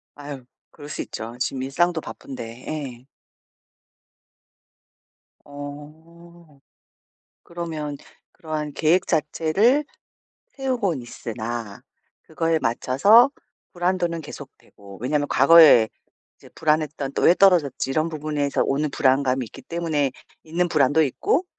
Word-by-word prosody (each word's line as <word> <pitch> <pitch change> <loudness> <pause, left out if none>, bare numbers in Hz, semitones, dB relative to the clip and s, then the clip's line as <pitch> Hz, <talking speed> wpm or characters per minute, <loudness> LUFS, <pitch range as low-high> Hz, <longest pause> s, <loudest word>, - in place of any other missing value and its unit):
아유. 145 -2 -8 0.3
그럴 145 -2 -12
수 - - -4
있죠. 115 +2 -7
지금 130 0 -2
일상도 170 +5 0
바쁜데. 120 -5 -9
예. 135 -5 -6 2.4
어. 155 +3 -12 0.8
그러면 160 -4 -5 0.4
그러한 155 -2 -5
계획 165 +5 +2
자체를 175 - +2 0.7
세우곤 245 - -1
있으나 115 -2 -6 0.4
그거에 165 0 -1
맞춰서 150 - +4 0.4
불안도는 175 -2 -1
계속되고. 100 -8 -13
왜냐하면 145 +3 0
과거에 140 -6 +7 0.5
이제 - - -17
불안했던 150 -3 -1
또 - - -1
'왜 170 - +7
떨어졌지?' 170 -10 +3
이런 155 +4 0
부분에서 150 -2 -1
오는 145 +2 0
불안감이 130 -1 +1
있기 - - -13
때문에 160 -5 -1 0.3
있는 170 +3 -1
불안도 150 0 +3
있고 370 - 0
150 Hz, 255 characters per minute, -23 LUFS, 135-170 Hz, 2.4 s, 과거에